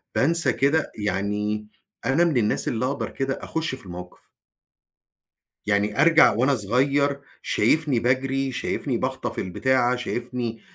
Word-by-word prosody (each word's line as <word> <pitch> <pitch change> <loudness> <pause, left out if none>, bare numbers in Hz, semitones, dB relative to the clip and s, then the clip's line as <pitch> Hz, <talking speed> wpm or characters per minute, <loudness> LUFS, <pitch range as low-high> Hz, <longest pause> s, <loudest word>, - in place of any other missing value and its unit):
بانسى 150 -3 +2
كده 145 +4 +1
يعني 105 +1 -2 0.4
أنا 140 +6 +3
من 160 -7 +1
الناس 105 -2 0
اللي 120 +1 -1
أقدر 130 -5 -2
كده 135 0 -2
أخُش 160 -4 -3
في 130 - -14
الموقف. 90 0 -10 1.4
يعني 105 +5 +1
أرجع 165 0 +6
وأنا 125 +6 +2
صغير 140 +6 +1 0.2
شايفني 150 -6 +2
باجري، 135 +2 0
شايفني - - -2
باخطف - - -3
البتاعة، 125 +6 +1
شايفني 120 -2 -4
125 Hz, 125 wpm, -24 LUFS, 105-140 Hz, 1.4 s, أرجع